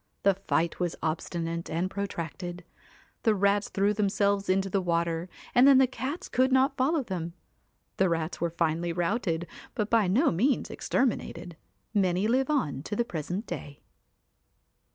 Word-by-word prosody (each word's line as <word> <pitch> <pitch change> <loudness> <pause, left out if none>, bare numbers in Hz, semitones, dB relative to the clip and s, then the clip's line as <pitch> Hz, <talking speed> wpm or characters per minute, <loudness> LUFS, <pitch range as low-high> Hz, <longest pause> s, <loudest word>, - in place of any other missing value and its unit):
The 200 - +5
fight 170 -3 -1
was 175 -2 -1
obstinate 165 +1 -2
and 170 +3 0
protracted. 180 -2 -5 0.6
The 220 -3 +3
rats 200 +1 +2
threw 200 +1 +2
them 210 -1 +1
selves 200 0 +1
into 190 +1 +2
the 195 0 0
water 170 0 -1 0.2
and 250 +2 +7
then 275 -2 +8
the 265 - +6
cats 265 +6 -4
could 260 +1 +2
not 265 +2 +3
follow 280 +3 +1
them. 175 -6 -4 0.6
The 190 -1 +3
rats 165 0 -2
were 170 - +1
finally 170 0 0
routed, 175 -1 -1 0.3
but 210 -1 -2
by 225 -4 +4
no 255 - +3
means 240 +11 +1
exterminated. 230 -8 -1 0.4
Many 190 -1 +2
live 260 +4 +2
on 155 - 0
to 185 - -4
the 235 - +1
present 180 - -4
day. 145 -4 -7
190 Hz, 155 wpm, -28 LUFS, 170-230 Hz, 0.6 s, then